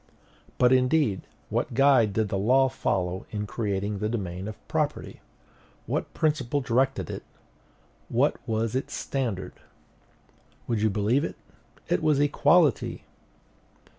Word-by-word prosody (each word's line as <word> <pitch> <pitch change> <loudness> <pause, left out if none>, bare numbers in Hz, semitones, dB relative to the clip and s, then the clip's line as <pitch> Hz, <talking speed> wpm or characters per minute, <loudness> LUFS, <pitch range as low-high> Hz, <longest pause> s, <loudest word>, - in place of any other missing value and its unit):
But, 125 0 +5
indeed, 125 - +2 0.2
what - - -1
guide 130 -6 +4
did 110 0 0
the 100 - -1
law 130 +6 +4
follow 90 -7 -2
in 105 -1 -3
creating 100 -2 -2
the 105 - -1
domain 95 -4 -4
of 110 - -7
property? - - -2 0.6
What - - -2
principle 145 -3 0
directed 130 - 0
it? - - -5 0.9
What - - +2
was 110 0 -1
its 130 - -3
standard? 120 -9 -3 1.1
Would 115 -3 -1
you 110 - +3
believe 105 +7 +1
it? - - -4 0.5
It 90 - +1
was 150 -2 +3
equality. 145 - +3
115 Hz, 125 wpm, -26 LUFS, 105-135 Hz, 1.1 s, But